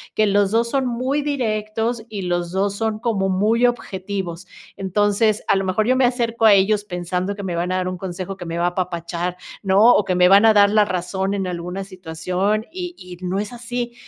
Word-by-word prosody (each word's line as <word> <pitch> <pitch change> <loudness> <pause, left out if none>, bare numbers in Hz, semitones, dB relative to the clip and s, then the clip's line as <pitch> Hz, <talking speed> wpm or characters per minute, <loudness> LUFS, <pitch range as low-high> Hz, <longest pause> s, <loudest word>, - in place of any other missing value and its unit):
que 215 - +3
los 200 -1 +2
dos 230 +1 +1
son 270 0 0
muy 255 +4 -1
directos 225 -4 -2
y 205 -3 -5
los 175 -1 -2
dos 195 +2 0
son 220 0 -2
como 210 -5 0
muy 215 +6 +2
objetivos. 190 -6 -4 0.3
Entonces, 205 +3 +1
a - - +4
lo 195 - -1
mejor 190 +3 0
yo 255 - +3
me 260 0 +3
acerco 235 -2 0
a 215 - +8
ellos 200 +2 +3
pensando 180 0 -3
que 200 - -7
me 180 -3 -3
van 175 +2 -1
a - - 0
dar 185 -1 -1
un 185 0 -4
consejo 185 +1 -5
que 180 -2 -9
me 165 0 -4
va 170 - 0
a - - +3
apapachar, 175 -1 -3 0.2
¿no? 205 +4 +5
O 210 - +3
que 185 - 0
me 180 0 +5
van 200 +3 +7
a 220 - +7
dar 205 -1 +6
la 210 0 +5
razón 190 +1 -2
en 195 -1 -2
alguna 180 +2 -4
situación 185 +3 -2
y 355 0 -6
y 180 -1 -11
no 180 +1 -2
es 210 +3 -4
así, 240 0 -4
200 Hz, 220 wpm, -21 LUFS, 180-225 Hz, 0.3 s, a